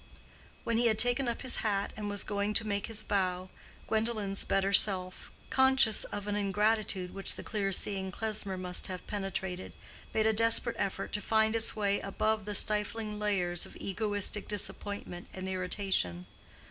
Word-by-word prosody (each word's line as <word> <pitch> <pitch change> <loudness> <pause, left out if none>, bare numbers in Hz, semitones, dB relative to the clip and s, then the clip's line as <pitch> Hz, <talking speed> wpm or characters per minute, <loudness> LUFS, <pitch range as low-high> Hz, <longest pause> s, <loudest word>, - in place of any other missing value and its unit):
When 230 - 0
he 240 - +3
had 220 -1 +1
taken 245 +3 +2
up 235 +2 -3
his 260 - +2
hat 200 -2 -1
and 210 -1 -5
was 205 -1 +1
going 205 0 -2
to 225 - +4
make 200 -2 -2
his 215 -1 +1
bow, 185 -2 -1 0.4
Gwendolen's 220 -3 -1
better 195 0 0
self, 185 -2 +2 0.2
conscious 265 -4 +4
of 205 - -6
an 205 0 -2
ingratitude 205 -2 0
which 195 - +1
the - - -8
clear 200 -3 -2
seeing 190 0 0
Klesmer 205 -2 -3
must 180 -1 -2
have 185 -1 -7
penetrated, 190 -2 -4 0.4
made 220 - +1
a 220 - +3
desperate 230 +2 +4
effort 195 0 -3
to 210 - -2
find 220 +1 +2
its 225 0 0
way 200 -2 0
above 215 +1 -1
the 210 0 -4
stifling 210 0 +5
layers 180 -5 -1
of - - -13
egoistic 205 +1 -1
disappointment 200 -3 -5
and 190 0 -6
irritation. 185 - -2
205 Hz, 165 wpm, -31 LUFS, 190-220 Hz, 0.4 s, stifling